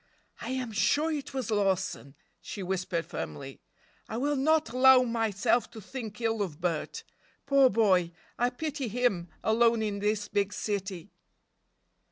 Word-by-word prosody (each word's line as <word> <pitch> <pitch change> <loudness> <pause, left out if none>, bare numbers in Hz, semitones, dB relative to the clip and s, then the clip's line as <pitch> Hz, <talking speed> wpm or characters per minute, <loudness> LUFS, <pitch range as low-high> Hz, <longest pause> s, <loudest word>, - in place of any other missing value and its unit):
"I - - -6
am 255 -3 -3
sure 300 +9 +2
it 295 -3 -4
was 260 -4 -3
Lawson," 190 -8 -1 0.3
she 200 - -6
whispered 185 -2 -2
firmly: 75 -3 -7 0.5
"I 220 - -3
will 290 +4 0
not 300 -2 +2
allow 255 +1 +7
myself 230 -1 +1
to 230 -1 -10
think 220 0 -7
ill 225 -2 0
of 170 -7 -4
Bert. 170 -3 -2 0.4
Poor 275 -2 +5
boy, 190 -6 +3 0.2
I 245 +1 +1
pity 280 +1 -4
him, 210 -7 0
alone 230 0 +3
in 205 -2 -2
this 210 0 0
big 205 0 0
city." 195 -3 -4
220 Hz, 145 wpm, -29 LUFS, 195-250 Hz, 0.5 s, allow